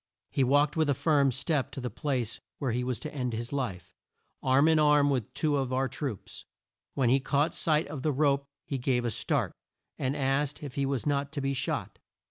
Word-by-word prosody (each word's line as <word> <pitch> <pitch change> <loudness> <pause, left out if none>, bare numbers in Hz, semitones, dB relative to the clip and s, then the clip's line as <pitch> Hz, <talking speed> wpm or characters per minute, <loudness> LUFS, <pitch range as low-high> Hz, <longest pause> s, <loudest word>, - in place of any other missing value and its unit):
He 135 - +2
walked 145 +3 +3
with 160 -2 +2
a 140 - +3
firm 140 -3 +3
step 140 0 -1
to 135 - -5
the 125 -1 -4
place 130 -7 -2 0.2
where 135 -4 -1
he 125 +2 -1
was 125 -1 -2
to 155 - -6
end 125 -4 -2
his 115 +4 -4
life, 100 -11 -3 0.5
arm 135 +3 +4
in 160 -1 +5
arm 150 -1 +5
with 125 -6 -1
two 150 -2 +1
of 135 -2 -1
our 130 +1 +1
troops. 130 -4 -6 0.5
When 125 -3 +3
he 135 - +5
caught 145 +3 +1
sight 155 -1 +1
of 145 -3 -6
the 155 - +1
rope 140 0 +2 0.2
he 135 - -3
gave 125 -1 +1
a 120 - 0
start, - - 0 0.5
and 135 +1 0
asked 140 +2 0
if 140 -3 -6
he 140 0 0
was 135 -3 -2
not 140 -1 0
to 145 - -2
be 135 0 0
shot. 135 - -3
140 Hz, 215 wpm, -29 LUFS, 130-145 Hz, 0.5 s, in